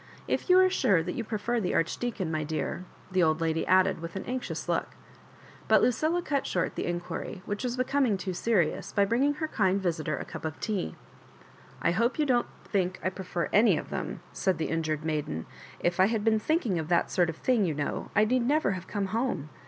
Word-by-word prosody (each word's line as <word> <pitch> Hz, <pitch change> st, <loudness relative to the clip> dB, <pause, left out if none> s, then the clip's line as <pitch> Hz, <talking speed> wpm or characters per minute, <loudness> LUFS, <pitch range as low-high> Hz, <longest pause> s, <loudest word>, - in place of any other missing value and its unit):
If -, -, -1 dB
you 365 Hz, -, +7 dB
are 375 Hz, 0 st, +7 dB
sure 235 Hz, -, +2 dB
that 180 Hz, -, -3 dB
you 235 Hz, -, -3 dB
prefer 225 Hz, +2 st, -1 dB
the 185 Hz, -5 st, -1 dB
Archdeacon, 185 Hz, +1 st, -1 dB
my 155 Hz, -1 st, -1 dB
dear—" 160 Hz, +4 st, -3 dB, 0.3 s
the 185 Hz, 0 st, +2 dB
old 155 Hz, -2 st, +3 dB
lady 165 Hz, 0 st, 0 dB
added, 185 Hz, -2 st, +4 dB
with 165 Hz, +2 st, -7 dB
an 190 Hz, -, -4 dB
anxious 255 Hz, +1 st, -4 dB
loc^ -, -, 0 dB, 0.8 s
But -, -, +5 dB
Lucilla 315 Hz, +8 st, +2 dB
cut 280 Hz, -4 st, -1 dB
short 180 Hz, -, 0 dB
the -, -, -3 dB
inquiry, 175 Hz, +2 st, -4 dB
which 205 Hz, +3 st, -3 dB
was 250 Hz, 0 st, -2 dB
becoming 255 Hz, -4 st, +2 dB
too 185 Hz, 0 st, -4 dB
serious, 185 Hz, -3 st, 0 dB
by 200 Hz, -, +3 dB
bringing 265 Hz, +8 st, +2 dB
her 315 Hz, +2 st, -2 dB
kmd 195 Hz, -9 st, +2 dB
visitor 165 Hz, -5 st, -1 dB
a -, -, -5 dB
cup 165 Hz, -3 st, -8 dB
of 160 Hz, -1 st, -4 dB
tea. 195 Hz, -, -2 dB, 0.4 s
" -, -, -23 dB
I -, -, +3 dB
hope 230 Hz, +8 st, +1 dB
you 305 Hz, -, +2 dB
don't 245 Hz, -3 st, +2 dB, 0.2 s
think 185 Hz, -3 st, -1 dB
I 185 Hz, -, +1 dB
prefer 185 Hz, -3 st, -3 dB
any 220 Hz, +3 st, +5 dB
of -, -, -6 dB
them," -, -, -4 dB
said 190 Hz, -2 st, 0 dB
the 160 Hz, -, -2 dB
injured 155 Hz, -1 st, -1 dB
maiden. 150 Hz, -, -2 dB, 0.2 s
" -, -, -18 dB
If 175 Hz, -, -11 dB
I 190 Hz, -, +6 dB
had 220 Hz, -1 st, -1 dB
been 220 Hz, 0 st, +3 dB
think 315 Hz, +9 st, 0 dB
ing 190 Hz, -7 st, 0 dB
of 160 Hz, -, -4 dB
that 175 Hz, 0 st, +2 dB
sort 175 Hz, -2 st, +2 dB
of 165 Hz, -, -4 dB
thing, 245 Hz, -5 st, +2 dB
you 160 Hz, -4 st, -1 dB
know, 145 Hz, 0 st, -3 dB
I 215 Hz, -, +5 dB
need 250 Hz, +3 st, +2 dB
never 295 Hz, -6 st, +2 dB
have 185 Hz, -1 st, -5 dB
come 205 Hz, -2 st, -2 dB
home. 220 Hz, -, -1 dB
190 Hz, 225 wpm, -28 LUFS, 165-240 Hz, 0.8 s, you